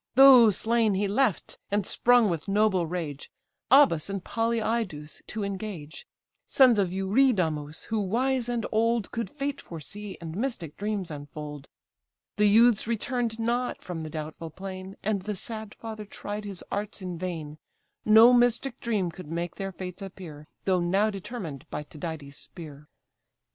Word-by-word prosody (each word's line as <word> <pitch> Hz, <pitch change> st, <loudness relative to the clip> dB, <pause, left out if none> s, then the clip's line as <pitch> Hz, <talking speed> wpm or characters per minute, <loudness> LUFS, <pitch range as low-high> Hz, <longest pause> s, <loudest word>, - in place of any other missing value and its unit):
Those 250 Hz, -6 st, +8 dB
slain 225 Hz, -2 st, +2 dB
he 200 Hz, +1 st, +1 dB
left, 220 Hz, +1 st, 0 dB
and 205 Hz, -1 st, 0 dB
sprung 245 Hz, +1 st, +4 dB
with 165 Hz, -3 st, -2 dB
noble 195 Hz, -4 st, +2 dB
rage 160 Hz, -5 st, -5 dB, 0.4 s
Abas 245 Hz, -, +5 dB
and 195 Hz, -2 st, -4 dB
Polyidus 225 Hz, -9 st, -2 dB
to 215 Hz, -1 st, -4 dB
engage; 195 Hz, -6 st, -6 dB, 0.4 s
Sons 250 Hz, -5 st, +5 dB
of 190 Hz, -3 st, +1 dB
Eurydamus, 190 Hz, -, +1 dB
who, 220 Hz, -1 st, 0 dB
wise 245 Hz, +5 st, 0 dB
and 235 Hz, -2 st, -1 dB
old, 230 Hz, -1 st, +1 dB
Could 230 Hz, -1 st, -3 dB
fate 285 Hz, -1 st, -4 dB
foresee, 195 Hz, +5 st, -8 dB
and 165 Hz, -1 st, -7 dB
mystic 200 Hz, -, -3 dB
dreams 205 Hz, -4 st, -3 dB
unfold; 145 Hz, 0 st, -8 dB, 0.7 s
The 210 Hz, 0 st, +5 dB
youths 225 Hz, +1 st, +5 dB
return'd 235 Hz, 0 st, -1 dB
not 240 Hz, +2 st, -1 dB
from 175 Hz, -3 st, -5 dB
the 155 Hz, -, -5 dB
doubtful 155 Hz, +1 st, -6 dB
plain, 190 Hz, +2 st, -8 dB
And 205 Hz, -2 st, 0 dB
the 210 Hz, +2 st, -4 dB
sad 220 Hz, +1 st, -5 dB
father 220 Hz, -2 st, -7 dB
tried 205 Hz, +1 st, -6 dB
his 195 Hz, -3 st, -7 dB
arts 205 Hz, 0 st, -4 dB
in 180 Hz, -2 st, -5 dB
vain; 160 Hz, -4 st, -5 dB, 0.4 s
No 225 Hz, +3 st, +8 dB
mystic 245 Hz, +1 st, +2 dB
dream 205 Hz, -7 st, -1 dB
could 180 Hz, -1 st, -10 dB
make 170 Hz, +2 st, -4 dB
their 195 Hz, 0 st, -3 dB
fates 180 Hz, 0 st, -7 dB
appear, 170 Hz, -6 st, -9 dB, 0.2 s
Though 185 Hz, -2 st, +3 dB
now 195 Hz, +5 st, +2 dB
determined 190 Hz, -, -7 dB
by 150 Hz, -, -4 dB
Tydides' 150 Hz, -2 st, -7 dB
spear. 150 Hz, -4 st, -10 dB
200 Hz, 150 wpm, -27 LUFS, 170-225 Hz, 0.7 s, Those